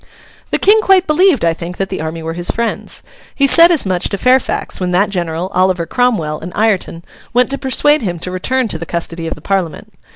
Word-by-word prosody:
The - - 0
King 430 +2 +4
quite 380 -3 +4
believed, 310 - +3
I 165 - +2
think, 170 +2 -8
that 195 0 -2
the 190 - -4
army 160 +1 -5
were 165 0 -4
his 175 +1 -3
friends. 235 0 -3 0.3
He 280 - +2
said 335 +5 +6
as 320 -9 +2
much 185 -2 -1
to 200 - -3
Fairfax 255 +4 0
when 180 -1 -2
that 200 +3 +2
general, 175 0 -3
Oliver 185 -2 +1
Cromwell, 170 -9 0
and 170 +3 -8
Ireton, 195 -6 -1 0.3
went 250 +2 +2
to 275 - -2
persuade 295 +3 +2
him 180 -6 -3
to 180 +2 -6
return 255 +7 -1
to 160 - -4
the 170 - -7
custody 165 -1 -4
of - - -4
the - - -15
Parliament. 190 -5 -3
190 Hz, 220 wpm, -15 LUFS, 170-260 Hz, 0.3 s, said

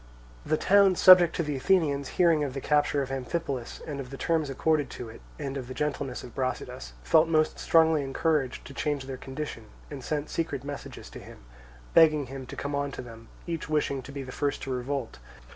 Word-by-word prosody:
The 155 - 0
towns 195 0 +4
subject 180 -3 +8
to 170 - 0
the 150 -2 -3
Athenians, 140 -2 +1
hearing 165 -4 +4
of 135 -2 -4
the - - -2
capture 145 0 +1
of 135 - -7
Amphipolis 135 -1 -4
and 145 -3 -5
of 130 -2 -6
the 135 - -8
terms 160 -2 0
accorded 145 +1 +1
to 120 - -7
it, 115 - -12 0.2
and 140 -2 -4
of 130 -2 -6
the 130 - -7
gentleness 140 -3 -3
of 120 - -10
Brasidas, 130 - -4
felt 155 - +4
most 155 -1 +1
strongly 160 -2 +4
encouraged 140 0 -1
to 140 - -10
change 145 -1 -2
their 135 0 -5
condition, 135 -4 -6 0.3
and 140 -3 -7
sent 150 +1 -3
secret 150 -5 -2
messages 145 -1 -8
to - - -9
him, - - -13 0.5
begging 155 -3 +5
him 130 0 -8
to - - -8
come 145 0 -4
on 140 0 -1
to - - -6
them; 115 -1 -12 0.2
each 165 -2 -4
wishing 145 -3 0
to 135 - -11
be 140 -1 -5
the 130 - -8
first 145 +2 -2
to 135 - -4
revolt. 130 - -3
140 Hz, 210 wpm, -28 LUFS, 130-155 Hz, 0.5 s, subject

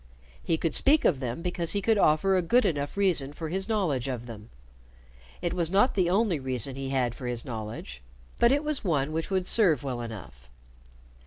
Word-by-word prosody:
He 165 - 0
could 160 -2 -2
speak 290 +3 +3
of 145 - +3
them 125 +4 -4
because 175 -2 -1
he 200 - -1
could 220 -1 +2
offer 190 +5 +3
a 185 - +3
good 240 +9 +2
enough 145 +1 -2
reason 170 -8 +2
for 160 +1 -6
his 190 +5 -3
knowledge 160 - 0
of 125 -3 -4
them. 110 -2 -10 0.9
It 175 - -1
was 170 -3 -1
not 205 +8 +3
the 185 -3 +1
only 195 -4 +1
reason 130 -1 -1
he 135 0 -5
had 130 -3 0
for 125 0 -7
his 120 -1 -2
knowledge, 110 - -7 0.4
but 235 - +5
it 285 +2 +1
was 300 -2 -1
one 150 -6 0
which 160 +1 -3
would 190 -2 0
serve 180 - +3
well 125 -3 -4
enough. 90 - -10
160 Hz, 200 wpm, -27 LUFS, 125-190 Hz, 0.9 s, but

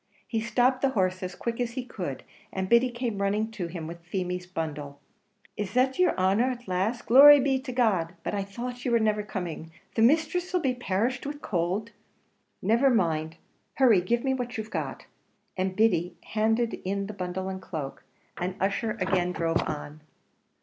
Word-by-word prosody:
He 225 -2 -1
stopped 245 +3 +2
the 275 - +3
horse 185 -1 +1
as 180 -1 -5
quick 235 +1 -3
as 235 -1 -2
he 255 -1 -4
could, 175 - -5 0.3
and 190 0 -2
Biddy 235 +4 +5
came 240 -4 -3
running 210 +3 0
to 195 -6 -4
him 170 -1 -6
with 170 +1 -8
Feemy's 180 0 -3
bundle. 150 -5 -5 0.6
"Is 205 +1 -4
that 260 +4 +2
yer 365 - +4
honer, 195 +7 +3
at 245 -1 -6
last? 195 +7 -1
Glory 285 +4 +9
be 265 0 +2
to 260 -1 -6
God! 195 -9 +1
but - - -3
I 200 - 0
thought 245 +5 -6
you - - 0
wor 235 -1 +4
niver 215 -1 +1
coming. 180 -5 -5 0.2
The 225 - 0
misthress 320 +8 +2
'll - - +4
be 265 -6 +1
perished 245 +3 -1
with 290 - -4
the - - -10
could." 185 +5 -1 0.7
"Never 235 +8 +4
mind 160 -8 +1 0.4
hurry 235 -9 +5
give 235 +6 0
me 265 -1 +1
what 250 -1 -3
you've 220 0 -5
got!" - - -4 0.5
And 185 0 -1
Biddy 180 -5 +2
handed 225 +2 0
in 200 +1 -2
the 210 - -6
bundle 185 -1 -4
and 190 0 -5
cloak, 155 -7 -6 0.3
and 180 +1 -3
Ussher 205 +3 -1
again 180 -1 +1
drove 165 0 +1
on. 150 0 -6
210 Hz, 185 wpm, -27 LUFS, 180-245 Hz, 0.7 s, Glory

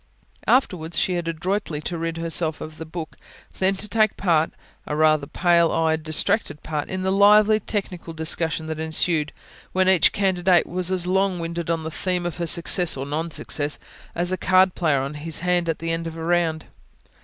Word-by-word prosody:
Afterwards 170 -10 +1
she 185 - +1
had 175 -1 -3
adroitly 170 0 -2
to 170 - -4
rid 165 0 -3
herself 165 -1 -1
of 155 0 -9
the 160 - -7
book, 160 -1 -7 0.4
then 190 +1 +2
to 205 +2 -4
take 215 0 +1
part 165 -4 +1 0.4
a 150 - -2
rather 155 -2 +3
pale 170 0 +2
eyed, 160 -1 +1
distracted 160 +2 -1
part 150 -2 -4
in 185 0 -3
the 190 - 0
lively 210 +2 +5
technical 190 -6 -5
discussions 160 0 -2
that 160 0 -4
ensued; 160 -1 0 0.4
when 185 0 +2
each 190 -4 +5
candidate 185 -3 +2
was 180 +1 0
as 185 -2 0
long 190 0 +1
winded 170 0 -4
on 165 -1 -1
the 160 - -5
theme 180 +1 -2
of 175 - -4
her 170 -1 -3
success, 170 0 +3
or 135 - -4
non 155 +4 -3
success, 150 -2 -1 0.4
as 175 +1 -1
a 185 - -1
card 185 0 +3
player 155 -6 +1
on 135 +2 -4
his 150 +2 -3
hand 175 -1 +1
at 160 - 0
the 165 0 -3
end 165 0 -2
of 165 0 -7
a 165 - -6
round. 165 -2 0
170 Hz, 195 wpm, -23 LUFS, 160-185 Hz, 0.4 s, lively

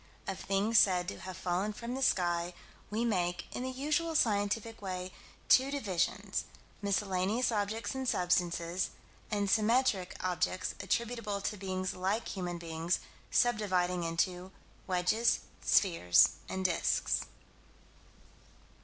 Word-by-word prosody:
Of 195 - -3
things 205 +3 +3
said 180 -2 +3
to - - -7
have 185 0 -7
fallen 185 +3 -1
from 235 +3 -5
the 265 - -3
sky, 175 -6 +1 0.3
we 225 +3 0
make, 175 -5 0
in - - -3
the 260 - -2
usual 305 +5 -1
scientific 220 -1 +1
way, 185 -1 -4 0.4
two 260 +1 +6
divisions: 200 -6 -1 0.4
miscellaneous 200 +4 +1
objects 215 +1 -1
and 265 -1 -1
substances, 175 0 +1 0.4
and 205 -2 0
symmetric 210 -3 +2
objects 185 0 -1
attributable 210 +1 -1
to 210 - -2
beings 185 -1 -3
like 195 +5 -1
human 180 -3 -3
beings, 165 +1 -1 0.3
sub 240 -2 +3
dividing 180 -3 0
into 180 +2 -1 0.4
wedges, 185 +6 +2 0.2
spheres, 90 - +5 0.2
and 190 0 -3
disks. 175 -3 +1
195 Hz, 120 wpm, -32 LUFS, 180-225 Hz, 0.4 s, two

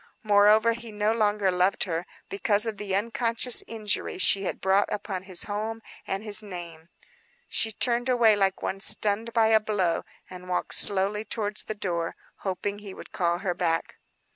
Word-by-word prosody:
Moreover 210 +2 +4
he 235 -1 -10
no 210 +1 0
longer 210 -3 +1
loved 180 +2 +1
her, 170 -1 -4 0.2
because 205 +2 +1
of 220 -3 -4
the 195 -2 -3
unconscious 230 +3 +1
injury 215 -4 -3
she 195 +1 +3
had - - -4
brought 195 +2 +1
upon 195 -3 -4
his 185 -2 -1
home 220 +2 -5 0.2
and 195 +2 -3
his 210 -1 +6
name. 170 -5 -10 0.6
She 220 - +1
turned 240 +3 0
away 235 -4 +4
like 195 -1 0
one 195 - -3
stunned 215 +2 +3
by 225 -1 +3
a 220 0 +5
blow, 200 -6 -1 0.2
and 180 0 -11
walked 180 - -2
slowly 200 +2 +4
towards 210 -2 -3
the 215 - -5
door, 170 -5 -3 0.2
hoping 200 +1 -4
he 200 -2 -10
would - - -12
call 170 -1 0
her 180 - 0
back. 170 -2 -2
205 Hz, 170 wpm, -26 LUFS, 190-220 Hz, 0.6 s, his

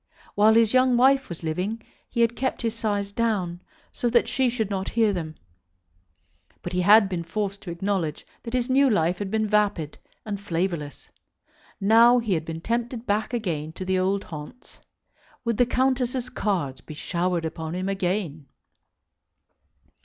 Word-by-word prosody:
While 215 +2 +5
his 230 -1 +4
young 255 -1 +4
wife 265 +2 +4
was 170 -1 -8
living 180 +8 -2 0.3
he 235 - -1
had 230 0 +3
kept 260 -1 -2
his 230 -1 0
sighs 205 -3 -2
down, 200 -6 -1 0.3
so 245 - -1
that 235 0 +3
she 260 0 +1
should 220 -4 -2
not 190 -1 -2
hear 225 -3 +2
them; 160 -4 -4 1.3
but 175 - -5
he 180 - +1
had 205 +3 +7
been 180 -3 -3
forced 200 +3 -3
to 180 - -8
acknowledge 170 -3 -2 0.2
that 235 +1 -5
his 245 -1 0
new 270 +1 +4
life 175 -4 +1
had 200 -2 -3
been 220 +1 0
vapid 205 -7 0 0.3
and 205 -2 -4
flavourless. 170 -6 -3 0.7
Now 230 +4 +6
he 230 -5 0
had 160 -2 -1
been 165 0 -6
tempted 235 +3 -2
back 210 +2 0
again 165 -10 -3
to 185 - -6
the 190 0 +1
old 195 +2 0
haunts. 150 +9 -10 0.7
Would 230 -2 0
the 245 - +4
Countesses' 255 -1 0
cards 175 - -2
be 155 - -10
showered 175 +1 -1
upon 160 +1 -5
him 185 +1 -2
again? 180 -6 -2
200 Hz, 165 wpm, -25 LUFS, 175-230 Hz, 1.3 s, had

